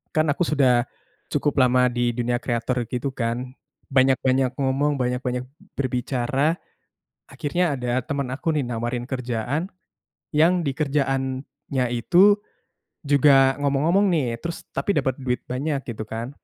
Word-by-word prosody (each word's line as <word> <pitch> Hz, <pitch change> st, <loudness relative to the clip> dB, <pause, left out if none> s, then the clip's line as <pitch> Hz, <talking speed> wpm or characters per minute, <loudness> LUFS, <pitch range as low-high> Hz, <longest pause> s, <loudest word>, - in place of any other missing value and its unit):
Kan 155 Hz, 0 st, +3 dB
aku 150 Hz, +4 st, +1 dB
sudah, 130 Hz, -6 st, +3 dB, 0.5 s
cukup 145 Hz, -, 0 dB
lama 125 Hz, 0 st, +4 dB
di 120 Hz, -1 st, 0 dB
dunia 120 Hz, +1 st, -1 dB
creator 120 Hz, +1 st, -1 dB
gitu 125 Hz, +2 st, -2 dB
kan 125 Hz, +2 st, -3 dB, 0.3 s
banyak-banyak 130 Hz, -1 st, +3 dB
ngomong, 140 Hz, +1 st, +1 dB
banyak-banyak 125 Hz, 0 st, -2 dB, 0.3 s
berbicara, 130 Hz, +4 st, 0 dB, 0.7 s
akhirnya 175 Hz, +2 st, -1 dB
ada 125 Hz, -1 st, -1 dB
temen 140 Hz, -4 st, -2 dB
aku 160 Hz, +5 st, -1 dB
nih -, -, +2 dB
nawarin 120 Hz, +1 st, -3 dB
kerjaan, 125 Hz, -, -2 dB, 0.7 s
yang 170 Hz, +4 st, +4 dB
di 140 Hz, -, 0 dB
kerjaannya 135 Hz, -2 st, -1 dB
itu, 180 Hz, -, +5 dB, 0.7 s
juga 140 Hz, -1 st, +5 dB
ngomong-ngomong 145 Hz, +8 st, +2 dB
nih 125 Hz, -7 st, -1 dB
terus 170 Hz, +4 st, -5 dB
tapi 200 Hz, -, -1 dB
dapet 135 Hz, -4 st, 0 dB
duit 125 Hz, -1 st, -1 dB
banyak 140 Hz, +4 st, -2 dB
gitu 110 Hz, -2 st, -5 dB
kan. 115 Hz, +3 st, -5 dB
130 Hz, 130 wpm, -23 LUFS, 125-145 Hz, 0.7 s, itu